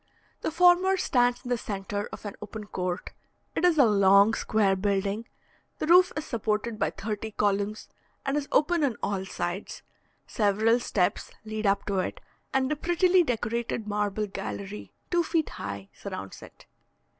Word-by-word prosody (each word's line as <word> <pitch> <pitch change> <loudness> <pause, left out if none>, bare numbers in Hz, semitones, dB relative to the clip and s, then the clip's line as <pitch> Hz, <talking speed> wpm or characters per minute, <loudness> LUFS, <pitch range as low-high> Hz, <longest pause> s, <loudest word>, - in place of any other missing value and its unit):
The - - -1
former 360 +3 +5
stands 245 -6 +2
in - - -5
the 245 -1 +1
centre 205 0 -4
of - - -9
an 205 - -5
open 210 0 -7
court; 180 -3 -4 0.4
it - - -2
is 350 -3 +4
a 275 - +7
long, 200 0 +5
square 210 -3 +2
building; 200 +3 -1 0.5
the - - -2
roof 360 +3 +6
is 305 0 -3
supported 220 -1 -2
by - - +2
thirty 215 +1 -4
columns, 205 0 -1 0.4
and 275 0 0
is 290 -1 -1
open 320 +2 +3
on 255 -6 0
all 195 -2 -1
sides; 185 0 -4 0.4
several 220 +3 +2
steps 190 -6 0 0.2
lead 215 -1 -2
up 195 0 +1
to 195 -2 0
it, 185 - -3 0.3
and 265 0 +1
a - - +2
prettily 355 +4 +3
decorated 235 -5 -2
marble 210 0 -1
gallery, 105 - -6 0.2
two 350 -1 +3
feet 325 -1 0
high, 100 -1 -7
surrounds - - -7
it. - - -14
215 Hz, 160 wpm, -27 LUFS, 200-275 Hz, 0.5 s, a